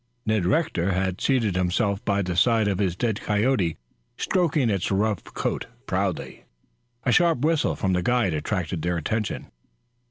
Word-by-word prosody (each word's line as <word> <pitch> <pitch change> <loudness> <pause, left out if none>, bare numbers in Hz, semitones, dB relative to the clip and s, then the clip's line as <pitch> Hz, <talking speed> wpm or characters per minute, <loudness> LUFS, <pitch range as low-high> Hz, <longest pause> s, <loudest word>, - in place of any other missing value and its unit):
Ned 110 -5 +1
Rector 100 - +1
had 95 0 -1
seated 115 -8 +1
himself 95 +3 0
by 100 -1 +1
the 90 -1 -3
side 110 +2 +3
of 100 -2 0
his 95 -4 0
dead 110 +1 -1
coyote, 105 -5 +1 0.4
stroking 160 -8 +1
its 95 -3 -1
rough 100 -2 0
coat - - -3 0.2
proudly. - - -2 0.6
A 125 - +2
sharp 165 -3 +3
whistle 155 0 +2
from 95 -1 0
the 90 - +1
guide 115 -2 +1
attracted 85 +2 -2
their 85 +1 0
attention. 105 +7 -3
100 Hz, 155 wpm, -25 LUFS, 90-120 Hz, 0.6 s, side